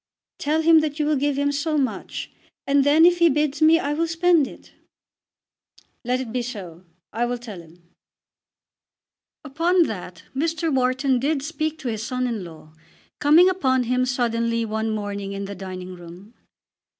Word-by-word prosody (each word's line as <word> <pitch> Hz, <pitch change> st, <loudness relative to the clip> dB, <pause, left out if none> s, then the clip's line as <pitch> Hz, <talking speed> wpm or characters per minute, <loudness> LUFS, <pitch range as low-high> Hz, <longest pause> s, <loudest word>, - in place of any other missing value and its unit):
"Tell 310 Hz, +2 st, 0 dB
him 325 Hz, 0 st, +6 dB
that 305 Hz, -1 st, -2 dB
you 300 Hz, -, 0 dB
will 305 Hz, 0 st, +2 dB
give 285 Hz, 0 st, 0 dB
him 285 Hz, 0 st, +1 dB
so 300 Hz, +2 st, -1 dB
much, 270 Hz, -3 st, -3 dB, 0.3 s
and 280 Hz, 0 st, +3 dB
then, 300 Hz, +4 st, +5 dB
if 350 Hz, 0 st, +4 dB
he 340 Hz, -1 st, +6 dB
bids 295 Hz, 0 st, 0 dB
me, 320 Hz, +1 st, +6 dB
I 290 Hz, -3 st, -2 dB
will 330 Hz, +2 st, 0 dB
spend 330 Hz, -3 st, +3 dB
it." -, -, -14 dB, 1.3 s
"Let 250 Hz, +1 st, 0 dB
it 255 Hz, -4 st, -5 dB
be 250 Hz, -, 0 dB
so. 185 Hz, -8 st, -8 dB, 0.3 s
I 235 Hz, +2 st, 0 dB
will 245 Hz, 0 st, -2 dB
tell 220 Hz, -7 st, -9 dB
him." 170 Hz, +1 st, -19 dB, 1.6 s
Upon 335 Hz, +5 st, +2 dB
that 180 Hz, -, -6 dB
Mr. 320 Hz, +2 st, -1 dB
Wharton 260 Hz, 0 st, +1 dB
did 280 Hz, +1 st, -1 dB
speak 310 Hz, 0 st, -3 dB
to 290 Hz, -5 st, -7 dB
his 220 Hz, -3 st, -3 dB
son 255 Hz, +1 st, -2 dB
in 230 Hz, -5 st, -3 dB
law; 160 Hz, -2 st, -13 dB, 0.5 s
coming 310 Hz, +5 st, +6 dB
upon 265 Hz, -9 st, +1 dB
him 250 Hz, +1 st, 0 dB
suddenly 230 Hz, -2 st, 0 dB
one 220 Hz, 0 st, -2 dB
morning 205 Hz, -2 st, -4 dB
in 200 Hz, 0 st, -4 dB
the 200 Hz, -, -6 dB
dining 185 Hz, -1 st, -7 dB
room. 180 Hz, +5 st, -13 dB
260 Hz, 170 wpm, -23 LUFS, 220-305 Hz, 1.6 s, him